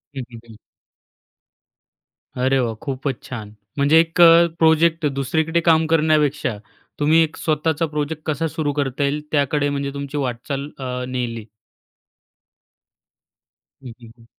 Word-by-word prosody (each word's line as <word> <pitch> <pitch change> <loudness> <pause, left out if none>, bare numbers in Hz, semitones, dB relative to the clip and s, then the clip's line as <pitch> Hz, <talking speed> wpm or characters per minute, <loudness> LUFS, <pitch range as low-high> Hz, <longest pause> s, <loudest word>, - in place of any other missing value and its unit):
हं, 130 - -4
हं, 115 - -9
हं. 115 -2 -14 1.8
अरे 130 +1 +1
वाह, 115 -3 -1
खूपच 135 -2 -4
छान. 110 -4 -8 0.2
म्हणजे 145 +3 +5
एक 165 +1 +1
अ, 170 0 +8
प्रोजेक्ट 160 0 +3
दुसरीकडे 155 +4 0
काम 160 -1 +3
करण्यापेक्षा, 150 -6 +1 0.4
तुम्ही 155 +3 +4
एक 155 - -5
स्वतःचा 160 +1 0
प्रोजेक्ट 150 +1 -3
कसा 155 +1 -1
सुरू 150 -2 -2
करता 140 -1 -2
येईल, 145 +2 -1
त्याकडे 145 0 +1
म्हणजे 140 -1 -3
तुमची 140 +1 -5
वाटचाल 135 +2 -3
अ, 125 -1 -4
नेली. 120 -4 -4 2.4
हं, 125 - -8
हं, 115 -1 -13
हं. 115 - -20
145 Hz, 130 wpm, -21 LUFS, 130-160 Hz, 2.4 s, अ